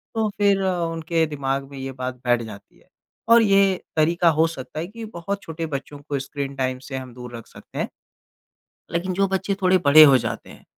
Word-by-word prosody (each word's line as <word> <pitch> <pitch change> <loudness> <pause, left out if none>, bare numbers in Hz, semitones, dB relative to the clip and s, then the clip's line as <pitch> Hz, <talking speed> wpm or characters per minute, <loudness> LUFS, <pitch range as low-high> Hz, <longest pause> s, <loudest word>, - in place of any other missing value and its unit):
तो 220 -1 +1
फिर 200 -1 +3
उनके 165 -3 0
दिमाग 140 -2 -2
में 140 - -9
ये 135 0 -5
बात 130 -1 -5
बैठ 120 -1 +3
जाती 105 -3 -11
है। - - -27 0.4
और 230 0 +8
ये 195 -3 +3
तरीका 170 +2 +3
हो 160 0 +3
सकता 155 -1 -7
है 170 - -3
कि 225 +2 -8
बहुत 200 0 -5
छोटे 165 0 -5
बच्चों 145 0 -6
को 140 - -1
स्क्रीन 140 0 -5
टाइम 130 -1 -2
से 135 - -4
हम 130 -2 -8
दूर 125 0 -9
रख 115 - -12
सकते - - -14
हैं। - - 0 1.1
लेकिन 175 +2 -1
जो 195 +2 +2
बच्चे 195 +1 -1
थोड़े 185 0 +4
बड़े 155 +2 +9
हो 135 -3 +7
जाते - - -5
हैं - - -15
160 Hz, 205 wpm, -23 LUFS, 135-185 Hz, 1.1 s, बड़े